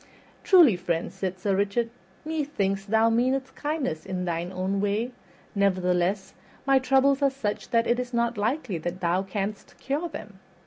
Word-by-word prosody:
"Truly, 340 - +7
friend," 175 -1 -2
said 190 -1 -3
Sir 195 +1 0
Richard, 205 +4 0 0.3
"methinks 280 -12 -1
thou 220 +2 +3
meanest 260 +3 +1
kindness 290 - -2
in 185 -1 -3
thine 170 +1 -2
own 190 +1 -1
way; 210 +4 0 0.4
nevertheless 185 -1 +1 0.3
my 270 -1 +5
troubles 270 +2 +3
are 280 - +4
such 245 -6 -4
that 230 0 +2
it 240 +1 +1
is 250 0 -4
not 235 -1 0
likely 220 - -1
that 175 +3 -4
thou 175 +1 +1
canst 195 +1 -5
cure 295 +6 -2
them. 205 -9 -9
205 Hz, 160 wpm, -26 LUFS, 190-260 Hz, 0.4 s, Truly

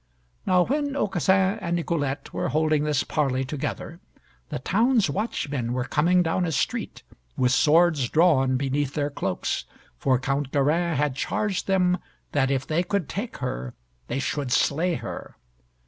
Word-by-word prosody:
Now 180 -1 +5
when 285 +1 -1
Aucassin 190 - +2
and 170 -2 -1
Nicolette 160 -5 -2
were - - -1
holding 155 -1 +1
this 150 -2 +1
parley 135 -3 0
together, 135 +2 -5 0.5
the - - -3
town's 220 - +2
watchmen 140 - -2
were 125 0 -1
coming 170 +7 +2
down 165 +2 0
a 170 - -1
street, 145 - -2 0.3
with 125 -1 +2
swords 155 -1 +4
drawn 135 -6 +3
beneath 140 +1 -1
their 145 -1 -1
cloaks, 95 -9 -2 0.3
for 130 -2 +2
Count 135 +1 -2
Garin 160 +4 +1
had 145 -2 0
charged 200 +7 -2
them 180 -2 +2 0.3
that 135 -3 +2
if 135 -1 0
they 160 +2 +1
could 190 -3 -1
take 225 +5 -5
her, - - -4 0.3
they - - -2
should 140 -1 -2
slay 160 +8 +2
her. - - -7
150 Hz, 150 wpm, -25 LUFS, 135-180 Hz, 0.5 s, Now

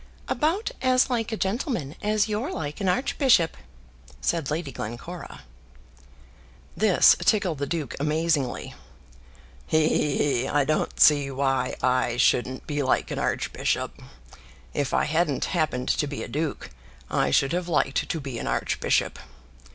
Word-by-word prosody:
"About 350 +10 0
as 255 0 +3
like 230 -2 -1
a 220 - -2
gentleman 195 - -2
as 210 0 +1
you're 220 - -2
like 150 - -5
an 190 - +1
archbishop," 235 - +2 0.6
said 165 -5 -1
Lady 155 -1 -3
Glencora. 120 - -7 1.3
This 210 -3 +5
tickled 180 -4 +1
the 140 - -2
duke 160 -3 -3
amazingly. 150 -2 0 0.9
"He, 155 0 +3
he, 150 -2 +1 0.2
he; 130 - -2
I 145 0 +2
don't 155 +1 -1
see 145 -2 +6
why 135 0 0
I 125 -2 +1
shouldn't 125 +1 +1
be 145 -1 -2
like 130 - 0
an - - -3
archbishop. - - -2 0.7
If 140 -2 -1
I - - +2
hadn't 155 -2 0
happened 155 -7 0
to 150 - +1
be 140 -1 -5
a - - -6
duke, 150 - -3 0.4
I 70 - +2
should 135 - +2
have 175 0 -1
liked 145 -5 0
to 165 - -1
be 135 -5 -5
an - - -5
archbishop. - - 0
155 Hz, 145 wpm, -25 LUFS, 135-190 Hz, 1.3 s, see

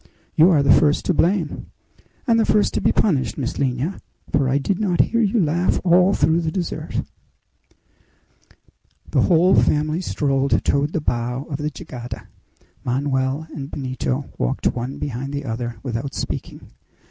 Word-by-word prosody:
"You 160 +4 +6
are 150 -6 +4
the 140 - +6
first 150 -1 +3
to 185 - +2
blame!" 175 -1 0 0.6
"And 230 -4 +3
the - - +4
first 210 -1 +2
to - - -1
be - - +3
punished, 155 -11 +1
Miss 130 -4 -3
Lina; 135 +6 -1 0.3
for 135 -2 +2
I 135 - +2
did 175 +7 -1
not 185 -5 0
hear 230 +1 +3
you 220 +1 +2
laugh 170 +1 +1
all 180 +2 +4
through 160 +3 +2
the 160 -1 -2
dessert." 175 0 -3 2.1
The - - +3
whole 180 +1 +4
family 155 +3 +2
strolled 140 -5 0
toward 140 +2 +1
the 160 - -1
bow 125 0 -2
of 140 - -2
the 150 +1 -2
jangada. 125 -4 -8 0.5
Manoel 135 +3 -1
and 140 -2 -6
Benito 130 0 -3
walked - - 0
one 125 +3 -4
behind 135 +1 -4
the 140 0 -3
other 120 0 -4
without 130 +1 -4
speaking. - - -5
145 Hz, 160 wpm, -21 LUFS, 130-170 Hz, 2.1 s, You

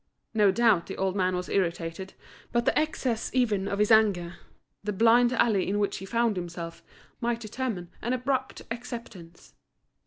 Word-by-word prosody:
No 210 -3 +4
doubt 205 -3 +3
the 195 - -6
old 190 0 0
man 185 -2 +1
was 180 0 -3
irritated, 175 0 -2 0.4
but 235 0 +1
the - - +2
excess 255 -7 0
even 210 -6 +2
of 200 - -2
his 210 +2 +2
anger, 195 -6 +3 0.5
the 210 - -1
blind 230 +4 +5
alley 220 -7 +2
in 205 - 0
which 205 -1 0
he 195 - -7
found 230 -2 +1
himself, 170 -1 -6 0.4
might 235 -1 -1
determine 215 -6 -4
an 240 - -2
abrupt 260 +1 -1
acceptance. 230 -8 -8
210 Hz, 160 wpm, -27 LUFS, 185-235 Hz, 0.5 s, blind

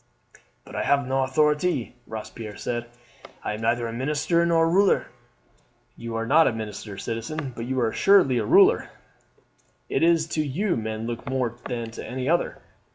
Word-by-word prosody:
"But - - -11
I - - -1
have 140 -1 +2
no 135 +1 +1
authority," 150 +1 +1
Robespierre 110 -1 -7
said. 120 -1 -3 0.6
"I - - -2
am 105 - -6
neither 115 +1 +1
a 115 - -5
minister 150 +7 +1
nor 165 -1 +3
a - - +3
ruler." 190 +4 +3 0.9
"You 115 -1 -6
are 115 0 -1
not 155 +6 +5
a - - +3
minister, 105 -2 -6
citizen, 120 +6 -4
but 115 - -5
you 130 0 -1
are 115 -2 +1
assuredly 180 - +4
a - - 0
ruler. 395 +5 +5 1.0
It - - 0
is 165 -1 +4
to 155 - 0
you 175 +8 -1
men 110 0 -4
look 120 +3 -5
more 130 -3 -1
than 115 -2 -4
to - - -8
any 130 0 -4
other. 170 +3 0
130 Hz, 175 wpm, -25 LUFS, 115-160 Hz, 1.0 s, not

